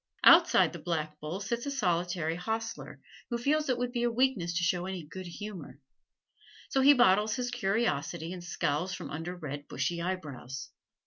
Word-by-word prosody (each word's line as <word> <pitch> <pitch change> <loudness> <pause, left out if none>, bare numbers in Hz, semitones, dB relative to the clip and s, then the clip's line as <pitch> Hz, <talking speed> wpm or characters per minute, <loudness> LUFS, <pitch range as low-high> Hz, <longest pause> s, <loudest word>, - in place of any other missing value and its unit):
Outside - - +7
the - - -7
Black 155 -3 -3
Bull 155 +5 -4
sits 235 +6 -3
a - - 0
solitary 175 - 0
hostler, 225 +5 -4 0.3
who 240 - -1
feels 295 +4 +1
it 255 - +2
would 245 0 -2
be 240 -1 -2
a 240 - +2
weakness 235 -8 +1
to 175 - 0
show 175 +1 +1
any 190 -3 -4
good 185 +4 -8
humor. 175 -7 -8 0.9
So 270 - +2
he 285 +2 +8
bottles 210 -3 +4
his 245 -1 -2
curiosity 190 - -1
and 180 -1 -8
scowls 175 +1 -1
from - - -7
under 165 +4 -4
red, 145 -4 -6
bushy 165 +6 -2
eyebrows. 145 -8 -5
180 Hz, 175 wpm, -30 LUFS, 165-235 Hz, 0.9 s, he